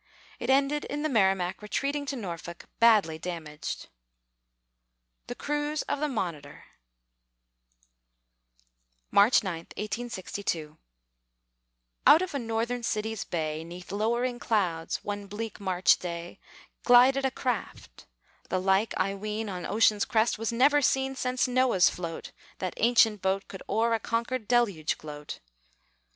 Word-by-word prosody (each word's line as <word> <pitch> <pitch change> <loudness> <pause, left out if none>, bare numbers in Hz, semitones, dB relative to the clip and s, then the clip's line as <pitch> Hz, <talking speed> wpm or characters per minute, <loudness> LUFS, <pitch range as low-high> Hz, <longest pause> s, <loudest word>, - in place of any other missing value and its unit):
It 240 - -4
ended 280 +2 +3
in 295 +1 -4
the 310 - 0
Merrimac 190 -7 +1
retreating 280 +7 -2
to 275 - -2
Norfolk, 170 -6 -7
badly 210 -9 +4
damaged. 160 -3 -6 1.4
THE 245 - -5
CRUISE 295 +2 -2
OF - - -3
THE 300 - 0
MONITOR 180 - -4 2.5
[March 205 +4 +5
9, 185 -4 -3 0.2
1862] 200 -7 -4 1.3
Out 320 +4 +8
of 370 - -5
a 280 - -1
Northern 230 +1 -2
city's 220 -2 -2
bay, 155 -2 -3
'Neath 175 +2 -10
lowering 235 +4 0
clouds, 180 -9 -1
one 205 -1 -4
bleak 215 +2 -6
March 185 -2 +3
day, 170 -1 -6 0.4
Glided 255 +2 +6
a 265 - +2
craft 250 0 -5 0.4
the 185 - 0
like, 195 +3 +1
I 195 - 0
ween, 210 +2 -4
On 180 -2 -5
ocean's 210 -1 +3
crest 220 -1 +1
was 225 0 -1
never 285 +5 +4
seen 270 0 +1
Since 255 0 0
Noah's 250 -7 +3
float, 170 -2 -6 0.3
that 185 -2 -3
ancient 225 -3 +4
boat, 190 +1 0
Could 190 - -9
o'er 225 +3 +2
a 225 - +1
conquered 230 +1 -2
deluge 205 -11 +1
gloat. 150 -1 -8
215 Hz, 130 wpm, -28 LUFS, 185-245 Hz, 2.5 s, Out